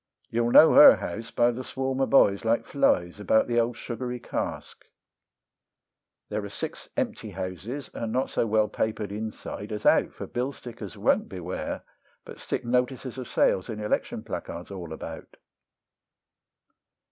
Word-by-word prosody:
You'll 115 +1 +1
know 160 +6 +8
her 285 0 +10
house 115 +6 -5
by 120 0 +3
the 125 +2 -6
swarm 130 +1 -3
of 135 - +1
boys, 100 -7 +5
like 115 +1 +1
flies, 90 -9 +1
about 105 +2 +3
the 120 -1 +1
old 115 0 0
sugary 125 +1 -5
cask: - - -5 1.4
There - - -2
are - - -6
six - - -6
empty - - -2
houses, 100 - -6
and 115 -1 -4
not 130 +3 0
so 115 - 0
well 110 0 +3
papered 105 -1 -2
inside 105 0 -6
as 105 -1 -5
out, - - +4
For - - -7
bill 125 +3 -3
stickers 120 -3 -9
won't - - +2
beware, 90 -1 -5 0.4
but - - -10
stick - - -3
notices 125 +1 -1
of 125 - -6
sales 95 - +2
and 110 -2 -4
election 105 0 -2
placards 85 +3 -6
all 90 -4 -7
about. - - -8
115 Hz, 155 wpm, -27 LUFS, 105-125 Hz, 1.4 s, her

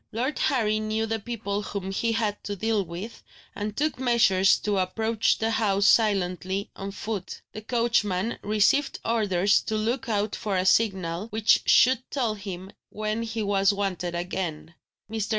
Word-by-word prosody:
Lord 255 +6 -2
Harry 215 -5 +1
knew 215 +1 -1
the 225 0 -2
people 210 -2 -3
whom 195 -2 -5
he 230 +4 0
had 215 -2 -1
to 205 - -3
deal 220 0 0
with, 180 +6 -8 0.3
and 205 +1 -5
took 305 -2 0
measures 225 -7 +4
to 205 -2 0
approach 220 +4 +1
the 225 0 0
house 200 -3 +1
silently, 195 -3 +2
on 195 0 -6
foot. 200 -1 -5
The 215 - -7
coachman 225 -3 0
received 215 +7 +2
orders 200 -4 +2
to 220 - -3
look 235 +4 -2
out 210 -1 0
for 200 -3 -2
a 185 - 0
signal, 190 -3 +1
which 220 -1 +3
should 255 0 +5
tell 245 -6 -1
him 195 -2 -7 0.2
when 215 +1 -3
he 225 -1 -3
was 200 -1 +3
wanted 185 -3 -2
again. 170 -2 -4 0.3
Mr. 220 -1 -3
210 Hz, 160 wpm, -26 LUFS, 195-225 Hz, 0.3 s, should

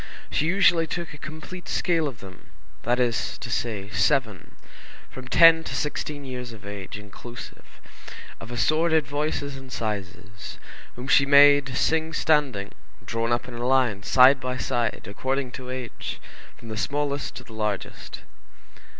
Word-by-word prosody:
She 155 - +1
usually 170 -3 +4
took 170 -1 -5
a 145 - -11
complete 155 +3 -9
scale 165 -3 +1
of 130 -6 -8
them, 95 -2 -13 0.3
that 120 +2 +1
is 120 -2 0
to 120 - -7
say, 105 -4 -2
seven, 115 - 0 0.6
from 130 -1 -9
ten 165 +3 +7
to - - -4
sixteen 150 -1 -3
years 125 -2 -6
of 105 -3 -12
age, 100 -1 -7
inclusive, 105 +4 -11 0.6
of 115 - -9
assorted 155 +7 +2
voices 145 -1 -2
and 135 -1 -11
sizes, 100 -3 -5 0.4
whom 125 +2 -7
she 140 0 +5
made 140 -2 +6
sing 160 +1 +1
standing, 145 -11 +1 0.3
drawn 115 0 -1
up 120 +1 0
in 125 - -8
a 120 +1 -3
line, 125 -6 +2
side 130 +6 +6
by 125 0 -3
side, 120 -3 -1
according 130 +5 -2
to 125 0 -8
age, 130 -2 -5 0.4
from 115 - -12
the 110 - -5
smallest 145 +4 -2
to - - -8
the 115 - -14
largest. 105 -3 -4
130 Hz, 150 wpm, -25 LUFS, 115-145 Hz, 0.6 s, ten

